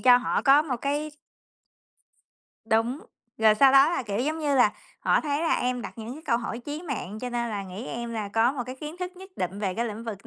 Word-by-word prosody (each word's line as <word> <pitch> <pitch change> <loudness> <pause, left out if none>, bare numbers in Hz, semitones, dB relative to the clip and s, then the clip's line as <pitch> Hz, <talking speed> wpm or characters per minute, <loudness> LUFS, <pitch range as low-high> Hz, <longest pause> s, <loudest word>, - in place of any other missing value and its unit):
cho 250 -1 +7
họ 250 - 0
có 285 +2 +6
một 265 -6 -2
cái 295 +2 -1 1.5
Đúng, 225 +5 +1 0.4
rồi 220 -1 +6
sau 270 +3 +6
đó 275 +4 +7
là, 345 - -1
kiểu, 205 -2 -3
giống 305 +5 -1
như 290 -3 0
là 230 -5 +5 0.3
họ - - +3
thấy 290 0 -1
là 330 - +2
em 250 -1 -1
đặt - - -6
những 225 +2 -6
cái 315 - -11
câu 235 -4 +2
hỏi 235 -1 -4
chí 295 +6 -6
mạng, 215 - -5
cho 250 -1 -4
nên 235 -1 -1
là 205 -2 -3
nghĩ 190 +7 -7
em 235 0 -5
là 215 -3 -3
có 225 +5 +2
một 255 -4 -3
cái 255 +1 -7
kiến 305 +4 -7
thức 360 0 -5
nhất 380 +1 -12
định 185 +2 -3
về 190 -3 -1
cái 235 - -1
lĩnh 225 0 -5
vực 205 -4 -7
245 Hz, 245 wpm, -26 LUFS, 220-290 Hz, 1.5 s, cho